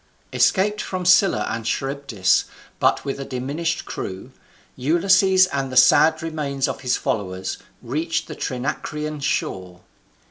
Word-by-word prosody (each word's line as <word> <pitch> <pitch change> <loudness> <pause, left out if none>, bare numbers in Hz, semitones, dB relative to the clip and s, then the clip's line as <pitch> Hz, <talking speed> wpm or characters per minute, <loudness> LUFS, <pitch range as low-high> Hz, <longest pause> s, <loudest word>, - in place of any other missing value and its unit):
Escaped 210 +2 +2
from 185 -1 -4
Scylla 185 +1 +4
and 115 - -3
Charybdis, 135 -7 0 0.3
but - - +2
with 140 0 -3
a - - -3
diminished 145 +6 -3
crew, 95 +7 -6 0.4
Ulysses 185 +6 +4
and 135 -1 -2
the 130 - -2
sad 155 +5 +5
remains 145 -4 -2
of - - -5
his 125 -1 0
followers 95 -2 -3 0.2
reached 155 +7 -2
the - - -7
Trinacrian 150 +3 -4
shore. 95 -10 -3
140 Hz, 130 wpm, -22 LUFS, 125-165 Hz, 0.4 s, sad